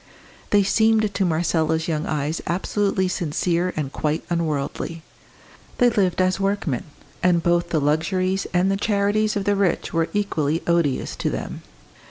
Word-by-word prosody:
They 205 -1 +4
seemed 220 +1 +2
to 195 - +1
Marcella's 160 -1 +1
young 155 -2 -1
eyes 150 +2 -2
absolutely 190 +2 0
sincere 175 +1 0
and 145 -3 -3
quite 155 +2 -1
unworldly. 165 0 -2 0.7
They 245 -1 +4
lived 185 -5 +1
as 185 +1 +2
workmen; 195 -10 -1 0.4
and 175 -2 +3
both 175 0 +2
the 165 - +1
luxuries 185 +6 0
and 180 +2 +2
the 195 - +1
charities 210 +1 +1
of 200 - -1
the 205 +1 +2
rich 195 -3 0
were 165 0 +1
equally 165 -7 -1
odious 170 -6 +1
to - - -1
them. - - -5
175 Hz, 150 wpm, -23 LUFS, 160-200 Hz, 0.7 s, They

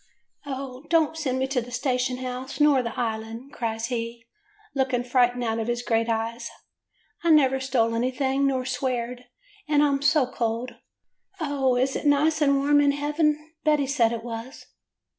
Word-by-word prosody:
* - - -48
" - - -34
'O 265 -2 -5
don't 320 -2 +3
send 275 -5 -1
me 260 - +1
to 265 -2 -1
the 240 - -9
station 250 0 -1
house 255 +2 -6
nor 295 -3 +5
the 235 -2 -5
Island,* 225 +3 -4
cries 225 -1 -2
he, 230 -1 -4 0.5
looking 260 -3 0
frightened 245 0 +2
out 225 -1 -1
of 225 - -2
his 240 0 -1
great 230 -1 +1
eyes. 230 +1 -2 0.7
'I 340 - +2
never 270 -4 +5
stole 245 -4 +1
anything, 265 +3 0
nor 260 -2 0
sweared, 250 -1 -3 0.4
and 295 -1 +3
I 295 - +4
*m 275 -1 0
so 295 -1 +4
cold. 240 0 -3 0.7
O, 280 -5 +1
is 260 +2 +1
it - - -1
nice 305 +2 +3
and 280 -1 +4
warm 290 +1 +4
in 285 -1 +3
heaven? 300 +1 0
Betty 300 -2 +3
said 250 -4 +2
it 230 -1 -4
was. 235 +3 -7
260 Hz, 180 wpm, -25 LUFS, 240-285 Hz, 0.7 s, nor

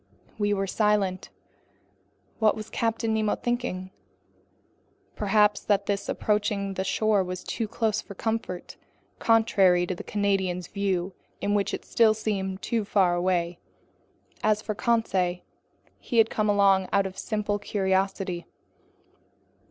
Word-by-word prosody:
We 205 0 +1
were 195 -1 +1
silent. 195 -2 0 1.1
What 215 -2 +4
was 215 -1 -8
Captain 225 -1 0
Nemo 215 -1 +1
thinking? 240 -7 -3 1.2
Perhaps 210 0 +3
that 200 -1 +2
this 200 0 -2
approaching 205 -2 0
shore 200 +2 +1
was 180 0 -5
too 225 - -3
close 220 -1 0
for 200 - -11
comfort, 220 -4 -3 0.4
contrary 195 -6 +4
to 185 - -2
the 180 - -8
Canadian's 190 -3 0
views 195 -2 -1 0.3
in 205 - 0
which 205 -1 +1
it - - -5
still 220 -2 +4
seemed 195 -3 -3
too 230 -2 0
far 195 -3 +2
away. 175 -1 0 0.8
As 215 0 +3
for 215 - -4
Conseil, 195 -6 0 0.6
he 235 - -3
had 225 -1 +5
come 215 -1 0
along 195 -2 +4
out 200 -1 +3
of 190 -1 -5
simple 210 -1 -2
curiosity. 190 -3 -1
200 Hz, 130 wpm, -26 LUFS, 190-215 Hz, 1.2 s, had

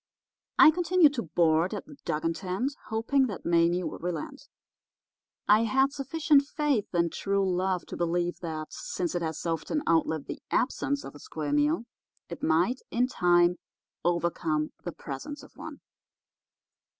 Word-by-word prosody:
"I 310 - +9
continued 350 -2 +4
to 250 - -2
board 165 +2 +2
at 205 - -6
the 290 - -13
Dugan 165 +2 0
tent, 195 - -2
hoping 255 +5 +1
that 205 - -7
Mame 170 +1 +2
would - - -7
relent. 280 - -5 1.0
I 215 +2 +5
had 265 +5 +2
sufficient 290 +1 +3
faith 285 -5 -1
in 170 -1 +2
true 195 -1 0
love 185 0 0
to - - -7
believe 175 +1 -1
that 155 -3 -5
since 175 -2 -3
it 175 - -1
has 160 0 -4
often 165 - -1
outlived 160 -2 +1
the - - -7
absence 280 +2 0
of - - -9
a 145 - -12
square 150 -2 -4
meal 150 +9 +2 0.4
it 170 - -7
might, 175 +11 +2
in 245 +2 +2
time, 175 -4 +3 0.5
overcome 170 -3 0
the 175 - -4
presence 155 - -7
of - - -15
one. - - -9
180 Hz, 150 wpm, -28 LUFS, 165-265 Hz, 1.0 s, I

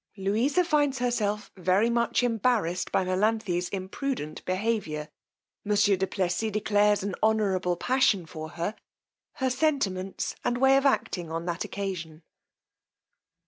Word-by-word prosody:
_Louisa 230 - +1
finds 290 -4 +2
herself 215 -4 -1
very 190 +4 +2
much 235 +1 +1
embarrassed 225 -6 0
by 190 - +2
Melanthe's 185 -1 0
imprudent 190 - -4
behaviour. 185 -6 -1 0.5
Monsieur 205 -1 +3
du 190 +1 -1
Plessis 185 +3 -1
declares 210 -1 +2
an 200 -1 -2
honourable 195 -5 +2
passion 225 -4 +2
for 155 -1 -7
her: 170 +5 -3 0.6
her 260 -1 -1
sentiments 245 -10 -1
and 245 - 0
way 265 +1 +5
of 275 +1 +4
acting 175 -10 -1
on 165 +1 -3
that 175 0 -2
occasion_. 175 -5 -5
205 Hz, 125 wpm, -27 LUFS, 180-235 Hz, 0.6 s, way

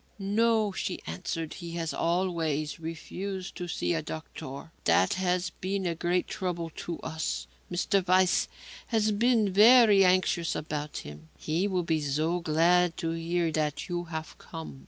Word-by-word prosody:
"No," 215 +1 +2
she 190 -1 -3
answered, 155 - -4
"he 170 -2 -7
has 165 -1 -2
always 165 -4 -1
refused 185 +4 -5
to 180 - -4
see 175 - -1
a 165 - 0
doctor. 155 -1 -8
That 95 - +4
has 180 -1 0
been 190 +2 -3
a 170 - +1
great 175 +2 0
trouble 175 -3 -3
to 170 -2 -5
us. 160 0 -3 0.3
Mr. 185 +1 +1
Weiss 185 0 +4 0.4
has 220 -2 +2
been 220 -2 +2
very 215 -1 +7
anxious 185 -2 +2
about 150 -1 -4
him. 75 +2 -11
He 165 +6 0
will 185 -3 0
be 160 -2 0
so 155 +5 0
glad 170 +1 +3
to 165 - -2
hear 165 0 -1
that 150 0 -2
you 175 0 -2
have 160 -1 -6
come. 160 -4 -8
175 Hz, 155 wpm, -28 LUFS, 160-190 Hz, 0.4 s, very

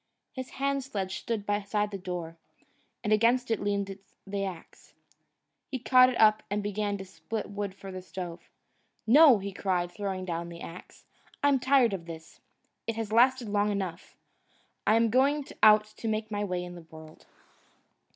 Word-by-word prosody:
His 260 -1 -6
hand 275 0 0
sledge 195 -7 -4
stood 220 -3 -3
beside 205 0 -1
the 200 - -4
door, 175 -3 -5 0.7
and 215 -1 +2
against 235 +3 +3
it 225 - +1
leaned 200 -1 -2 0.3
the 200 0 -3
axe. 180 -4 -10 0.7
He 265 - -2
caught 255 0 +6
it 255 - -3
up 215 -1 +5
and 205 +1 -1
began 205 0 -2
to 195 - -8
split 205 +2 -6
wood 200 -1 -4
for 195 -1 -9
the 185 0 -6
stove. 180 -1 -8 0.6
"No!" 275 +1 +8
he 200 0 -6
cried, 180 -2 -1
throwing 190 -1 -4
down 170 -1 -4
the 170 0 -10
axe, 175 +2 -11 0.4
"I'm 285 -2 +4
tired 255 -3 +4
of 170 -3 -5
this. 160 -1 -10 0.5
It 230 - -1
has 225 -2 -4
lasted 250 +1 +4
long 205 0 +1
enough. 190 -3 -5 0.7
I'm 225 +1 +4
going 275 +4 +3 0.2
out 215 0 +7
to 225 - -5
make 215 0 -2
my 205 0 -1
way 180 -3 -2
in 175 0 -8
the 170 -2 -12
world." 160 0 -14
205 Hz, 170 wpm, -29 LUFS, 185-230 Hz, 0.7 s, No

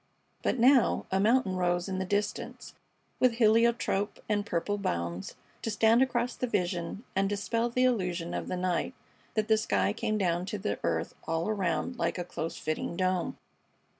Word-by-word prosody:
But - - 0
now 250 +1 +4
a 190 - +2
mountain 215 -2 +3
rose 175 0 +1
in 190 -1 -2
the 190 - -1
distance 205 +2 -3 0.5
with 255 -2 +4
heliotrope 230 -2 +2
and 205 -1 +1
purple 205 +2 -1
bounds 85 - -3 0.3
to - - -2
stand 225 +3 +4
across 250 -2 +1
the 250 - -2
vision 180 -1 -2
and 195 0 +2
dispel 230 +3 0
the 250 +2 +1
illusion 180 -9 0
of - - -3
the 185 - -2
night 185 +7 -1 0.4
that 215 -1 +1
the 220 -1 +4
sky 100 - +1
came 215 - -1
down 180 -2 0
to 210 - -3
the 205 +1 -2
earth - - -1
all 165 +1 0
around 210 +4 -1
like - - 0
a 175 - -2
close 165 -2 -4
fitting 155 +2 -3
dome. 185 -1 0
200 Hz, 170 wpm, -29 LUFS, 175-225 Hz, 0.5 s, now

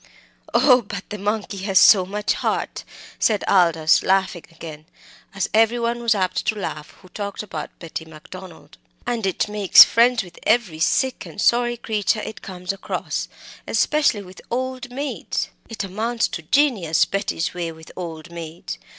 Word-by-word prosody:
"Oh! 250 +1 +6
but 200 -3 -7
the 210 - -5
monkey 205 0 -2
has 195 0 0
so 185 -4 +7
much 210 +2 -1
heart," - - -2 0.4
said 210 -3 +2
Aldous, 165 -4 +4
laughing 190 -2 0
again, 160 -2 -11 0.5
as 195 - -1
every 225 +2 +4
one 235 0 -1
was 230 -2 +2
apt 185 -2 -1
to 215 - +1
laugh 165 -7 -5
who 185 - -16
talked 200 +2 -5
about 210 - -6
Betty 165 -1 -7
Macdonald, 160 - -13 0.3
"and 225 -4 -1
it 190 - -1
makes 210 -2 +8
friends 240 0 +3
with 175 -2 -14
every 215 -9 +1
sick 260 +9 0
and - - -11
sorry 240 +2 +2
creature 215 -1 -1
it 220 - -8
comes 180 -1 -5
across, 195 - -4 0.4
especially 290 -9 +2
with 185 0 -13
old 255 +1 -3
maids! 275 +3 -3 0.2
It 225 -2 -4
amounts 220 +5 -1
to 165 - -5
genius, 200 - +2
Betty's 195 -4 -2
way 175 -2 -3
with 160 0 -14
old 165 -2 -7
maids. 170 0 -7
200 Hz, 160 wpm, -22 LUFS, 175-230 Hz, 0.5 s, makes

